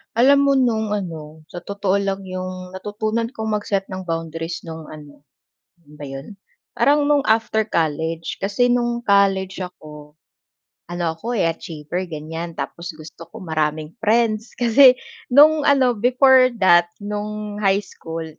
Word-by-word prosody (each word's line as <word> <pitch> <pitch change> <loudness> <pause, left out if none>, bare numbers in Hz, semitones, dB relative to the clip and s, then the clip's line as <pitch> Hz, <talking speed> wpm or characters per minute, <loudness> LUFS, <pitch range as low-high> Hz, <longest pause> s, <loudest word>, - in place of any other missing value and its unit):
Alam 270 +4 +5
mo 280 - +3
no'ng 220 -4 0
ano 160 -6 -5
sa 175 -1 -9
totoo 200 -1 -1
lang, 195 -1 -1
'yong 185 0 -6
natutunan 215 +4 -3
kong 220 -3 -5
mag-set 200 -2 -2
ng 185 -1 -6
boundaries 165 0 -4
no'ng 160 -1 -8
ano, 150 -2 -13 0.5
kailan 160 -4 -21
ba 150 - -9
'yon? 135 +1 -8 0.5
Parang 290 +1 +4
no'ng 290 -1 +3
after 220 0 +1
college. 160 -3 -2
Kasi 205 +5 0
no'ng 240 -1 0
college 195 -1 +3
ako, 150 -4 -12 0.8
ano 175 0 -3
ako, 230 +8 -5
eh, 170 - +2
achiever 165 +2 -5
ganyan. 165 +2 -6
Tapos 170 0 -6
gusto 155 +1 -11
ko - - -11
maraming 155 +1 -2
friends 220 0 +1
kasi 250 +2 +6 0.4
no'ng 300 +2 +6
ano 265 -3 +4
before 255 +3 +5
that, 175 -2 +5
no'ng 210 0 -5
high 195 +1 +3
school, 165 -3 -7
195 Hz, 145 wpm, -21 LUFS, 165-225 Hz, 0.8 s, kasi